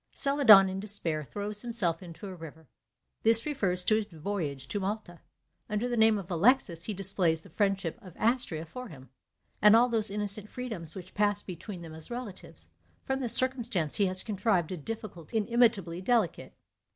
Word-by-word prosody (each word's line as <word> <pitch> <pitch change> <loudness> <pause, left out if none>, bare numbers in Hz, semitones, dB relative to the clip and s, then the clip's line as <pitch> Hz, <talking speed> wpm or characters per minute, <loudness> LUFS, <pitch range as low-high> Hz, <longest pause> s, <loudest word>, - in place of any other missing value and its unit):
Celadon 245 -9 +6
in 190 0 -4
despair 175 -7 -1
throws 205 +6 -4
himself 205 -9 0
into 175 +2 -11
a 190 - -7
river; 160 -2 -12 0.5
this 225 0 +4
refers 190 -12 -2
to 215 - +3
his 220 - -2
voyage 160 -6 -5
to 205 - -3
Malta. 195 -3 -5 0.5
Under 210 +3 -1
the 245 - -2
name 220 -1 +4
of 190 -2 -8
Alexis 175 -2 +2
he 215 - -3
displays 180 -4 +2
the - - -17
friendship 195 -5 -1
of 185 -4 -14
Astrea 220 -9 +1
for 250 +10 -9
him, 135 - -14 0.5
and 210 +1 +7
all 240 +2 +4
those 220 -3 +1
innocent 205 +1 -2
freedoms 220 -11 -7
which 185 -1 -10
passed 205 0 0
between 180 0 -8
them 160 -1 -10
as 160 0 -10
relatives; 240 -5 -9 0.4
from 265 -1 -2
this 245 -4 +6
circumstance 240 - 0
he 200 - +2
has 185 0 +6
contrived 200 -5 -1
a 185 - -4
difficulty 195 +1 -6
inimitably 215 -6 +1
delicate. 215 -3 -1
200 Hz, 175 wpm, -29 LUFS, 175-225 Hz, 0.5 s, and